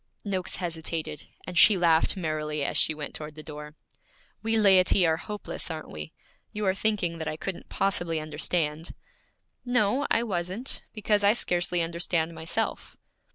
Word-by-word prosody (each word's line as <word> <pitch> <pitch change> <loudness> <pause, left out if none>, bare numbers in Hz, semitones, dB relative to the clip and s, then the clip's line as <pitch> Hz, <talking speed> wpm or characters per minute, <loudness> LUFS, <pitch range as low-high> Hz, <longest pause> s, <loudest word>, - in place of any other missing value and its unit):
Noakes 190 -3 -1
hesitated, 160 -3 -3 0.2
and 180 - -7
she 200 +3 +7
laughed 170 +1 +3
merrily 155 -3 -2
as - - -2
she 155 - +4
went 150 -1 -6
toward 150 -1 -5
the 155 - -9
door. 150 -1 -9 0.7
'We 225 0 +1
laity 190 -3 +5
are 160 -1 +2
hopeless, 205 +1 -5
aren't 160 -1 -6
we? 75 0 -7 0.4
You 210 0 -3
are 190 - +3
thinking 190 -5 0
that 160 - -4
I 155 - -3
couldn't 190 +2 -5
possibly 175 -4 0
understand?' 155 +1 -1 0.7
'No, 245 +2 +2
I 230 - +3
wasn't, 190 +4 -3
because 210 -1 +1
I 200 +1 +6
scarcely 175 -5 +1
understand 170 0 -1
myself.' 160 0 -3
175 Hz, 155 wpm, -27 LUFS, 155-200 Hz, 0.7 s, she